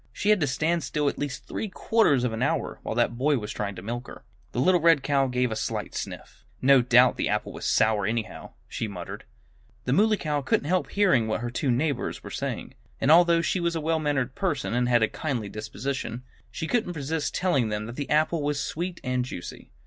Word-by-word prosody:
"She 205 - +1
had 210 - +4
to 145 - +2
stand 160 +5 0
still 145 +2 -1
at - - -7
least 145 -2 -4
three 220 - -4
quarters 185 - +2
of 125 -3 0
an 110 - -4
hour, - - -1
while - - -4
that 120 - +1
boy 145 +2 +3
was 105 -2 -5
trying 100 -2 -3
to 90 - -9
milk 120 +3 -4
her." - - -11 0.3
The - - -3
little 180 +6 +4
red 165 -4 +5
cow 140 -1 +2
gave 125 -1 0
a - - -1
slight - - -3
sniff. - - -7 0.2
"No 135 0 +6
doubt 125 +1 +5
the - - 0
apple - - -1
was - - -7
sour, 105 -3 +2
anyhow," 110 -1 -4
she 115 - -3
muttered. 90 -4 -7 0.6
The 125 - +1
Muley 215 +5 +4
Cow 150 -4 -1
couldn't 135 - 0
help 185 +2 +1
hearing 180 - +3
what 110 0 -1
her 120 0 -3
two 130 +2 -1
neighbors 135 +2 -1
were - - -8
saying. - - -4 0.3
And 140 - +3
although 170 0 +6
she 185 - 0
was 170 -1 0
a - - 0
well 160 +1 0
mannered 140 -4 -1
person 150 - -1
and 125 0 +1
had 120 -2 +4
a - - +4
kindly 125 -9 -3
disposition, 120 +4 -4 0.3
she 160 - -5
couldn't 215 -2 0
resist 150 +1 -2
telling 140 -11 +1
them 105 0 -3
that 120 +2 -7
the 145 0 -4
apple 155 +2 +2
was 145 0 -1
sweet 170 +5 -3
and 125 -1 0
juicy. 105 -8 -8
135 Hz, 225 wpm, -26 LUFS, 120-160 Hz, 0.6 s, No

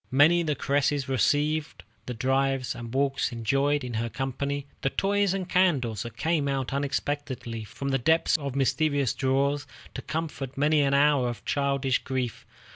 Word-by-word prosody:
Many 150 +6 +5
the 155 -3 -1
caress 140 0 0
received, 145 +5 0 0.2
the 125 - -4
drives 135 +2 0
and 115 -1 -8
walks 135 +1 0
enjoyed 135 +5 +1
in 125 -1 -5
her 115 +1 -1
company, 140 +2 -3 0.2
the 135 - +1
toys 200 +4 +1
and 190 -2 -2
candies 140 - +2
that 120 -1 -7
came 160 -3 0
out 135 -2 -2
unexpectedly 140 -4 -3
from 140 +6 -5
the 135 0 +1
depths 160 +6 +3
of 140 -3 -5
mysterious 140 -1 +1
drawers, 140 +2 0 0.3
to - - -5
comfort 150 -5 -4
many 150 +1 +3
an 140 -1 +2
hour 140 -3 +4
of 120 - -7
childish 140 -2 +1
grief. 130 -3 -4
140 Hz, 160 wpm, -27 LUFS, 130-145 Hz, 0.3 s, Many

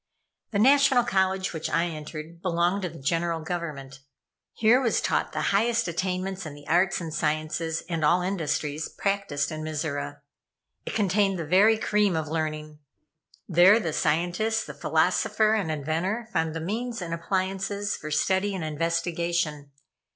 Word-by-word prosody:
The 210 - -2
National 270 +2 +5
College 190 -4 0
which 160 -1 -3
I 165 - +2
entered 155 0 -7
belonged 180 +2 +1
to 180 - -2
the 165 - -11
General 165 +4 -1
Government. 155 -5 -5 0.5
Here 230 +4 +4
was 235 -4 +2
taught - - 0
the - - -1
highest 225 +1 +2
attainments 185 +2 -2
in 155 -3 -7
the 145 0 -14
arts 180 +2 +2
and 165 -3 -6
sciences, 155 +2 -1
and 165 -3 -2
all 175 +4 +3
industries 155 -4 -2
practised 195 -8 -1
in 155 0 -5
Mizora. 155 - -4 0.7
It - - -4
contained 200 -2 +2
the 165 - -4
very 200 +7 +5
cream 210 -4 +1
of 160 -1 -2
learning. 155 -1 -3 0.7
There 185 +5 +6
the 165 -8 -3
scientist, 180 +10 0
the - - -8
philosopher 215 0 +2
and 205 -7 0
inventor 165 +10 -2
found 160 -2 0
the 165 - -3
means 230 +7 -3
and 170 -3 -4
appliances 195 +3 -2
for 155 - -7
study 190 +6 +1
and 180 - -4
investigation. 165 -1 -1
175 Hz, 150 wpm, -26 LUFS, 155-195 Hz, 0.7 s, There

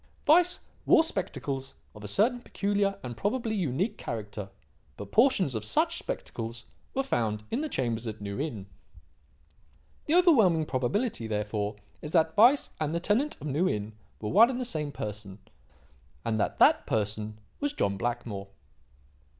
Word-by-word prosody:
"Weiss 350 +4 +5 0.3
wore 320 - +7
spectacles 140 - -3 0.2
of 105 - -12
a - - -5
certain 235 - +2
peculiar 200 -3 0
and 120 -1 -5
probably 220 - -1
unique 185 - -1
character. 105 -3 -5 0.5
But 100 -1 -8
portions 225 - +4
of 110 -2 -3
such 110 -1 +1
spectacles 115 +1 -5 0.3
were 270 - +1
found 110 - -1
in 245 - 0
the 310 - -2
chambers 120 - -2
at 110 -1 -5
New 100 +1 -5
Inn. 120 -10 -3 1.4
"The 310 - +3
overwhelming 220 - +5
probability, 130 - -1
therefore, 105 -1 -2 0.3
is 150 - -7
that 160 -2 +3
Weiss 245 +7 +5
and 155 0 -1
the 170 - 0
tenant 225 - +1
of - - -8
New 155 +6 +1
Inn 105 +1 -3 0.3
were 105 - -4
one 225 +6 +7
and 255 -1 -3
the 255 - -2
same 155 -10 -2
person; 105 -5 -6 0.9
and 110 -1 0
that 105 - 0
that - - +5
person 105 0 -2 0.2
was 290 0 0
John 100 - 0
Blackmore." 115 -3 -3
140 Hz, 155 wpm, -28 LUFS, -, 1.4 s, wore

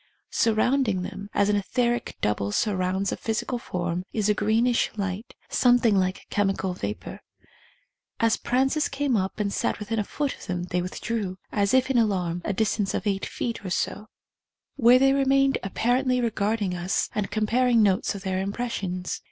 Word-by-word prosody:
Surrounding 225 -3 +2
them, 200 +2 -7
as 200 - +2
an 210 - +2
etheric 240 +4 -1
double 105 -1 0
surrounds 190 - 0
a - - -1
physical 230 +2 -2
form, 175 -3 -3
is 215 -2 +1
a - - +5
greenish 225 +4 +2
light, 195 +2 -4
something 245 -3 +4
like 185 -1 0
chemi 200 -2 +1
cal 190 -1 -2
vapour. 105 - -5 1.0
As 230 -1 +3
Prances 270 +5 +1
came 275 -2 0
up 190 0 -1
and 200 -1 -1
sat - - 0
within 220 +1 -3
a - - +1
foot 285 +6 -2
of - - -13
them 180 -1 -2
they 180 0 -1
withdrew, 185 +1 -3
as 200 -1 +1
if 260 0 +3
in 250 - +3
alarm, 180 -6 0
a - - -1
distance 205 0 0
of - - -3
eight 195 -2 -1
feet 230 -3 -4
or 190 - -4
so, 205 +4 -2 0.7
where 245 -1 +6
they 270 +1 +4
remained 275 0 +3
apparently 250 +6 +1
regarding 215 -4 0
us 180 +2 -1
and 210 -2 -2
comparing 230 +2 +3
notes 195 +1 +2
of 195 - -7
their 190 -1 -1
impressions. 190 -3 -3
210 Hz, 170 wpm, -25 LUFS, 190-240 Hz, 1.0 s, where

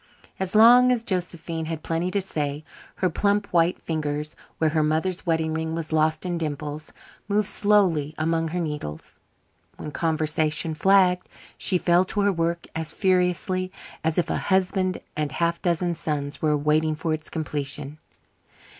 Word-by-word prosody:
As 190 +1 -3
long 245 +3 +8
as 240 -2 +1
Josephine 170 -4 -3
had 160 -1 -5
plenty 165 +2 -1
to 200 +2 +1
say, 150 -5 -2 0.3
her 185 - +1
plump 205 +4 +1
white 170 +1 +3
fingers, 150 -1 -3 0.2
where 160 -1 +2
her 155 0 +2
mother's 160 +5 0
wedding 160 -1 +1
ring 160 0 -2
was 165 -1 -5
lost 155 +1 +1
in 175 -2 -2
dimples, 150 -1 -4 0.4
moved 205 0 +1
slowly 185 -9 +3
among 165 +1 0
her 175 +3 -3
needles. 150 - -5 0.6
When 150 - -6
conversation 155 0 0
flagged 185 +1 +3 0.3
she 185 - +2
fell 175 +1 +3
to 205 +2 0
her 200 0 +3
work 170 0 -1
as 160 -1 -3
furiously 185 0 0 0.3
as 160 0 0
if 175 - +1
a - - 0
husband 190 -1 0
and 150 -2 -2
half 170 0 0
a - - -39
dozen 175 0 0
sons 145 -3 -4
were 150 -1 +2
waiting 155 +2 +1
for 160 +1 -2
its 155 0 -5
completion. 150 -1 -4
165 Hz, 160 wpm, -24 LUFS, 155-185 Hz, 0.6 s, long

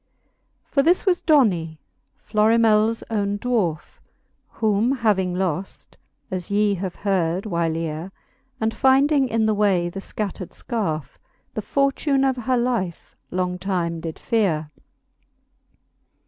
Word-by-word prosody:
For 275 - +1
this 345 +8 +3
was 365 -3 +2
Dony, 185 - +2 0.5
Florimels 220 +1 +3
owne 205 -2 0
dwarfe, 205 -9 -2 0.5
Whom 220 +3 +1
having 200 -8 +1
loft 185 0 -3 0.4
(as 185 -2 -3
ye 205 0 +2
have 185 -1 -4
heard 185 -2 0
whyleare^ 165 -3 -2 0.5
And 220 0 0
finding 270 +1 +3
in 225 -1 +1
the 215 - +2
way 195 -4 +2
the 195 - -7
/cattred 195 -3 -5
fcarfe, 180 - -3 0.3
The - - -3
fortune 275 0 +1
of 265 -1 +2
her 255 +1 0
life 235 -8 -2
long 180 0 -2
time 175 -3 -2
did 160 -1 -6
feare. 165 -10 0
205 Hz, 120 wpm, -23 LUFS, 175-235 Hz, 0.5 s, this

